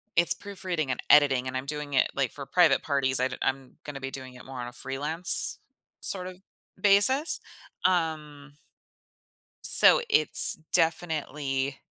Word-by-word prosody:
it's 170 Hz, 0 st, +2 dB
proofreading 185 Hz, -8 st, -5 dB
and -, -, -4 dB
editing, 135 Hz, -3 st, +4 dB
and 130 Hz, -, -5 dB
I'm 130 Hz, -, -4 dB
doing 150 Hz, 0 st, -6 dB
it, 130 Hz, -, +2 dB
like, 140 Hz, -3 st, -1 dB
for 140 Hz, -, -9 dB
private 175 Hz, 0 st, +3 dB
parties. 135 Hz, -3 st, 0 dB
I'd 130 Hz, +1 st, -2 dB
I'm 135 Hz, -1 st, -3 dB
gonna 140 Hz, -2 st, -8 dB
be 135 Hz, 0 st, -6 dB
doing 130 Hz, -1 st, -9 dB
it 125 Hz, -, -14 dB
more 130 Hz, -1 st, -9 dB
on 120 Hz, -, -5 dB
a 120 Hz, -, -10 dB
freelance 145 Hz, +7 st, +1 dB, 0.4 s
sort 185 Hz, -2 st, -1 dB
of 185 Hz, -1 st, -10 dB, 0.4 s
basis. 230 Hz, +10 st, +3 dB, 0.5 s
Um 155 Hz, -5 st, -2 dB, 1.1 s
so -, -, +4 dB
it's 430 Hz, -, +4 dB, 0.2 s
definitely 150 Hz, -5 st, -1 dB
145 Hz, 145 wpm, -26 LUFS, 135-170 Hz, 1.1 s, editing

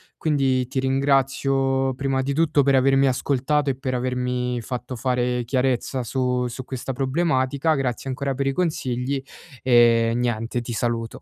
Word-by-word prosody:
quindi 135 Hz, -5 st, +1 dB
ti 130 Hz, -, -2 dB
ringrazio, 135 Hz, 0 st, +1 dB
prima 135 Hz, 0 st, -1 dB
di 140 Hz, +1 st, -2 dB
tutto 155 Hz, -3 st, +3 dB
per 140 Hz, 0 st, +3 dB
avermi 135 Hz, +1 st, +4 dB
ascoltato 140 Hz, +2 st, +1 dB
e -, -, -5 dB
per 130 Hz, -1 st, -3 dB
avermi 125 Hz, -1 st, -2 dB
fatto 125 Hz, +2 st, -5 dB
fare 125 Hz, 0 st, 0 dB
chiarezza 130 Hz, +1 st, -1 dB
su 125 Hz, +1 st, -1 dB
su 125 Hz, +2 st, -5 dB
questa 130 Hz, 0 st, -5 dB
problematica. 135 Hz, +1 st, +1 dB
Grazie 135 Hz, -2 st, -2 dB
ancora 135 Hz, 0 st, -2 dB
per 140 Hz, -, -2 dB
i 135 Hz, -, +1 dB
consigli 135 Hz, -5 st, -1 dB, 0.4 s
e 115 Hz, -2 st, +4 dB
niente, 120 Hz, 0 st, -1 dB
ti 120 Hz, -, -7 dB
saluto. 115 Hz, 0 st, -2 dB
130 Hz, 150 wpm, -23 LUFS, 125-135 Hz, 0.4 s, avermi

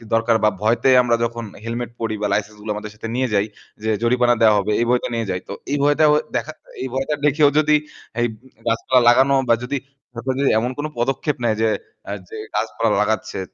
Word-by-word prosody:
দরকার 115 Hz, 0 st, +2 dB
বা 105 Hz, -, +6 dB
ভয়তে 115 Hz, +4 st, +2 dB
আমরা 120 Hz, -1 st, +2 dB
যখন 115 Hz, 0 st, -3 dB, 0.2 s
helmet 120 Hz, +1 st, -4 dB
পরি 110 Hz, -1 st, -2 dB
বা 105 Hz, -, +1 dB
license 105 Hz, +1 st, -2 dB
গুলো 105 Hz, 0 st, -4 dB
আমাদের 105 Hz, 0 st, -6 dB
সাথে 110 Hz, -, -7 dB
নিয়ে 130 Hz, +1 st, +1 dB
যাই 100 Hz, 0 st, +3 dB, 0.4 s
যে 110 Hz, -, -1 dB
জরিমানা 120 Hz, 0 st, +3 dB
দেওয়া 110 Hz, -2 st, +6 dB
হবে 100 Hz, +2 st, -1 dB
এই -, -, +2 dB
ভয়তে 125 Hz, 0 st, +2 dB
নিয়ে 115 Hz, -1 st, -1 dB
যাই। 90 Hz, -, -2 dB
তো -, -, -5 dB, 0.2 s
এই 145 Hz, -, +1 dB
ভয়টা 145 Hz, +2 st, +3 dB
ও -, -, +5 dB, 0.2 s
দেখা 155 Hz, -, -1 dB, 0.3 s
এই 130 Hz, -, -2 dB
ভয়টা 135 Hz, +3 st, -1 dB
দেখেও 150 Hz, 0 st, +4 dB
যদি 150 Hz, 0 st, +4 dB, 0.5 s
এই 120 Hz, -, +3 dB, 0.4 s
গাছপালা 115 Hz, +3 st, +2 dB
লাগানো 130 Hz, +3 st, +5 dB
বা 115 Hz, -, +6 dB
যদি 140 Hz, +3 st, -2 dB, 0.4 s
সরকার 125 Hz, +2 st, -3 dB
যদি 140 Hz, -, +3 dB
এমন 120 Hz, +3 st, -1 dB
কোনো 150 Hz, +1 st, -3 dB
পদক্ষেপ 135 Hz, +4 st, 0 dB
নেয় 110 Hz, -2 st, +2 dB
যে 110 Hz, -, +3 dB, 0.4 s
আ -, -, -3 dB, 0.2 s
যে 440 Hz, -, -8 dB, 0.2 s
গাছপালা -, -, 0 dB
লাগাচ্ছে, -, -, -1 dB
120 Hz, 210 wpm, -21 LUFS, 110-135 Hz, 0.5 s, বা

